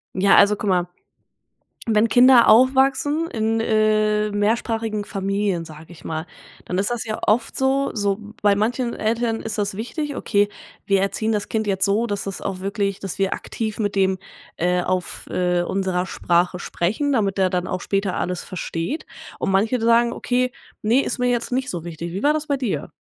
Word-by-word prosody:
Ja, 195 +1 +4
also, 210 +1 +6
guck 205 -1 -3
mal, 180 -1 +2 1.0
wenn 220 +1 +4
Kinder 250 0 +7
aufwachsen 270 +6 +4
in, 225 0 0
äh, 215 -1 +2
mehrsprachigen 215 0 -1
Familien, 195 -3 -1
sage 155 0 -12
ich 165 -4 -14
mal, 160 +1 -4 0.4
dann 180 - -3
ist 200 +4 0
das 240 0 -2
ja 215 -1 -4
oft 230 +3 +1
so 270 +1 +1
so 205 -2 0 0.2
bei 205 -1 +4
manchen 235 +4 -1
Eltern 225 +1 -1
ist 220 -1 -5
das 200 -1 -1
wichtig: 290 +6 -4
„Okay, 205 -5 +1 0.4
wir 195 -1 +3
erziehen 215 +3 -1
das 210 -1 -2
Kind 220 -1 -1
jetzt 190 -1 +1
so, 215 +4 +1
dass 205 -2 -3
das 195 -2 -5
auch 190 -2 -4
wirklich 200 0 -2
dass 195 -1 -6
wir 195 -1 +1
aktiv 220 -1 -5
mit 205 -1 -1
dem, 190 -1 +2 0.4
äh, 180 +1 +1
auf, 185 0 -3
äh, 180 -1 +1
unserer 185 -1 -1
Sprache 175 0 0
sprechen, 220 +12 -1
damit 200 -6 +1
der 190 -1 +2
dann 180 -1 -1
auch 185 - -3
später 195 -1 -1
alles 180 0 -3
versteht.“ 180 - -4 0.3
Und - - 0
manche 215 +6 +2
d - - -2
sagen: 235 +1 +4
„Okay, 250 0 0 0.3
ne, 235 +6 +3
ist - - -3
mir 250 - +1
jetzt 240 0 -1
nicht 255 +1 -1
so 175 -6 -4
wichtig.“ 170 0 -6
Wie 195 - -4
war 295 +1 +4
das 310 0 -2
bei 280 - 0
dir? 250 -6 -3
210 Hz, 190 wpm, -22 LUFS, 190-235 Hz, 1.0 s, Kinder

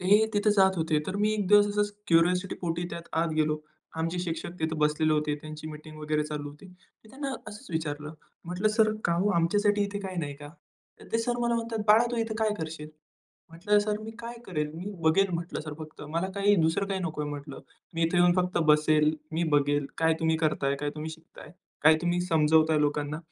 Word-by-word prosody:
ते 205 +4 +4
तिथे 205 +1 +3
जात 190 -2 +4
होते. 160 -2 +1
तर 190 - -3
मी 210 +1 +2
एक 205 -3 -1
दिवस 205 0 +7
असाच 205 0 0
क्युरिऑसिटी 180 +3 +3
पोटी 170 -1 -2
त्यात 170 0 -7
आत 170 - 0
गेलो. 155 0 +1 0.4
आमचे 165 +2 -1
शिक्षक 170 -1 -4
तिथं 160 0 -1
बसलेले 150 +1 +2
होते. 150 -1 +1
त्यांची 155 0 -8
मीटिंग 155 0 -10
वगैरे 150 0 0
चालू 150 -1 -5
होती. 150 +6 -13 0.4
त - - -17
त्यांना 275 0 -4 0.2
असंच 215 +6 -11
विचारलं 150 -2 -3 0.3
म्हटलं 180 +5 0
सर 215 0 +3
काम 175 +4 +2
आमच्यासाठी 205 +5 +2
इथे 200 0 -4
काही 190 -2 -6
नाही 145 -4 -3
का? 145 0 -10 0.5
तर - - -13
ते 225 - +2
सर 240 +1 -1
मला 235 0 +1
म्हणतात 230 -1 -2
बाळा 220 +3 +7
तू 240 - -2
इथे 225 -1 -1
काय 220 -1 +2
करशील? 155 -1 -6 0.6
म्हटलं 205 +6 +2
सर 210 0 -1
मी 220 +1 -7
काय 235 +1 -7
करेल 150 -4 -2
मी 180 +5 -6
बघेल 165 +5 +4
म्हटलं 170 -1 -4
सर 150 -1 -7
फक्त 155 -1 -10
मला 165 +4 -1
काही 200 +1 +3
दुसरं 160 +5 +1
काही 195 -1 -2
नको 160 -4 -3
आहे 145 - -4
म्हटलं. 145 -1 -7 0.3
मी 165 - -1
इथे 165 +2 +1
येऊन 175 0 +5
फक्त 180 0 +1
बसेल, 150 0 +4 0.2
मी 165 +2 0
बघेल 145 0 +2
काय 160 0 +3
तुम्ही 160 0 +2
करत 155 -3 0
आहे 140 +1 +1
काय 145 +1 -3
तुम्ही 155 +1 -5
शिकत 160 +1 -14
आहे 150 - -12 0.3
काय 160 +1 +7
तुम्ही 175 0 +1
समजवत 160 -2 +3
आहे 155 -1 +3
लोकांना 145 0 -1
165 Hz, 215 wpm, -28 LUFS, 155-205 Hz, 0.6 s, दिवस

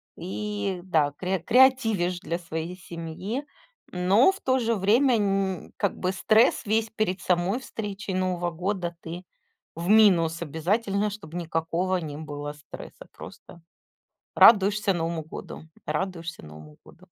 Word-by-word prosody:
и 200 0 -4
да, 155 -6 +1
кре 185 0 -1
креативишь 225 -5 +3
для 170 -2 -3
своей 165 +1 -5
семьи. 185 - -6 0.5
Но, 190 - +4
в 390 - -12
то 260 0 +2
же 230 -1 +1
время, 230 +6 +3
нь 195 -3 -1
как 200 - -1
бы 185 - -1
стресс 215 +6 +3
весь 220 +1 +1
перед 215 -4 -2
самой 180 +6 +1
встречей 205 -5 -6
Нового 180 -2 -1
года 175 0 -3
ты 170 +3 -7 0.5
в 170 +2 -5
минус 180 -7 +5
обязательно, 200 +6 0
чтобы 195 -5 -8
никакого 170 +2 -1
не 150 -4 -6
было 145 -1 -6
стресса. 150 0 -12
Просто 170 - -12 0.8
радуешься 205 -1 +6
Новому 165 -1 -2
году, 155 - -9 0.2
радуешься 165 - -4
Новому 75 0 -13
году. - - -18
185 Hz, 135 wpm, -26 LUFS, 165-210 Hz, 0.8 s, радуешься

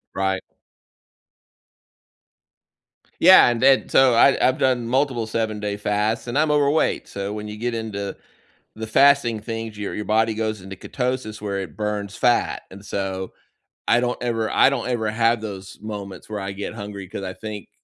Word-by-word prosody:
Right. 95 0 0 2.8
Yeah, 185 -6 +8
and 120 -1 -1
then 135 0 +4
so 130 -2 +5
I 135 +4 +5
I've 130 - +2
done 125 -3 +1
multiple 130 -2 0
seven-day 110 -2 -2
fasts, 105 +3 -1
and 120 - -2
I'm 155 0 +3
overweight, 145 +1 +2
so, 100 0 -5
when 105 0 -6
you 105 0 -7
get 120 +2 -2
into 105 -3 -4 0.6
the 110 0 -6
fasting 120 -1 +4
things, 115 0 -6
your 105 - -4
your 105 - -4
body 110 +1 +2
goes 110 -1 -2
into 95 +1 -9
ketosis 125 -2 -3
where 100 -2 -3
it 90 -6 -8
burns 105 -1 -3
fat, 120 -1 +1
and 100 +1 -12
so, 95 -2 -4 0.6
I 120 - +4
don't 125 0 -2
ever 115 -2 -1
I - - +5
don't 135 -4 -2
ever 115 -4 -1
have 115 +1 +2
those 95 -3 -8
moments 100 -3 -7
where 105 -1 -4
I 95 0 -4
get 100 +1 -6
hungry, 100 -2 -7
'cause 100 - -7
I 95 -1 -4
think, 105 -3 -8
110 Hz, 170 wpm, -22 LUFS, 100-120 Hz, 2.8 s, Yeah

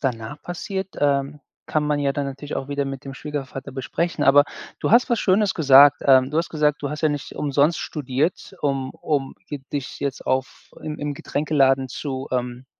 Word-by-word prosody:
danach 130 +1 -3
passiert, 190 +2 -4
ähm, 140 0 0 0.3
kann 155 - +1
man 150 -1 +1
ja 140 -1 +1
dann 140 0 -2
natürlich 140 +2 -6
auch 135 +1 -5
wieder 140 0 -1
mit 135 -1 -6
dem 135 - -7
Schwiegervater 140 -2 -6
besprechen. 150 +4 -2
Aber 145 +1 +7 0.4
du - - 0
hast 250 +2 +5
was 235 - +2
Schönes 200 +1 +3
gesagt. 145 -1 +7
Ähm, 130 0 +6
du 155 - 0
hast 170 - 0
gesagt: 150 -2 +1
„Du 140 - -2
hast 150 - -5
ja 155 - +4
nicht 145 -1 -5
umsonst 145 +3 +1
studiert, 150 +6 -2
um 135 -2 -1
um 140 -3 -2 0.2
d 145 -2 -4
dich 140 -3 -4
jetzt 140 -2 -3
auf 130 0 -2
im 155 -1 -4
im 145 0 -3
Getränkeladen 135 -3 +1
zu“, 135 0 -5
ähm, 125 +1 -3
145 Hz, 190 wpm, -23 LUFS, 135-150 Hz, 0.4 s, Aber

